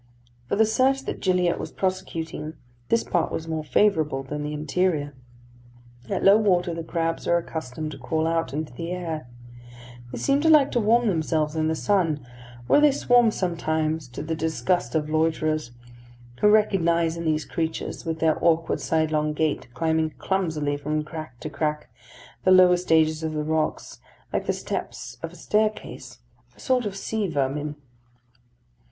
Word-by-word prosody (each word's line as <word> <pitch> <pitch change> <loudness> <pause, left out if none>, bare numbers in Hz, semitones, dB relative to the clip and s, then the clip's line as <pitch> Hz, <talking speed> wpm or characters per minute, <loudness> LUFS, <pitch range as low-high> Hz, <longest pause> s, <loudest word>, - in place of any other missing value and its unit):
For - - +1
the 220 +2 +4
search 260 +5 +2
that - - -4
Gilliatt 180 -2 +1
was - - -5
prosecuting, 165 -4 -3 0.3
this 230 - +3
part 170 - 0
was 160 - -4
more 160 -1 -2
favourable 155 -6 +2
than 150 +2 -5
the 150 0 -3
interior. 150 0 -1 1.0
At 195 - -1
low 200 +2 +7
water 180 -5 +2
the 165 0 -5
crabs 165 0 -2
are 170 - +4
accustomed 155 -2 -5
to 140 - -9
crawl 160 +6 -1
out 165 0 0
into 150 -1 -4
the 165 +7 -5
air. 165 -7 -4 0.8
They - - -5
seem 275 +1 +2
to 320 - +3
like 295 -3 +6
to 240 - +1
warm 230 +2 +3
themselves 155 -4 0
in 155 0 +1
the 160 - 0
sun, 165 -8 0 0.4
where 290 - +4
they 300 -1 +6
swarm 245 -3 +4
sometimes 160 -5 -1
to 125 +3 -7
the 160 +1 -3
disgust 160 -3 -1
of 155 -1 +1
loiterers, 155 -2 0 0.7
who - - +4
recognise 170 -6 +3
in 170 - -5
these 155 -1 0
creatures, 160 -1 -3
with 165 -1 -3
their 160 -1 +2
awkward 165 -1 +2
sidelong 155 -1 +1
gait, 155 -1 -1
climbing 160 +1 0
clumsily 160 -7 -1
from 150 +1 -2
crack 155 -5 -8
to 155 - -4
crack 150 -1 -2 0.5
the - - +3
lower 185 -1 +7
stages 160 -3 +2
of 160 -1 -3
the 150 -1 -2
rocks 155 0 -2 0.3
like - - -1
the - - +3
steps - - -5
of - - -5
a - - -14
staircase, 215 0 -2 0.4
a - - -22
sort 250 -4 +1
of 195 - -5
sea 210 +1 -2
vermin. 145 -1 -2
160 Hz, 165 wpm, -25 LUFS, 155-185 Hz, 1.0 s, low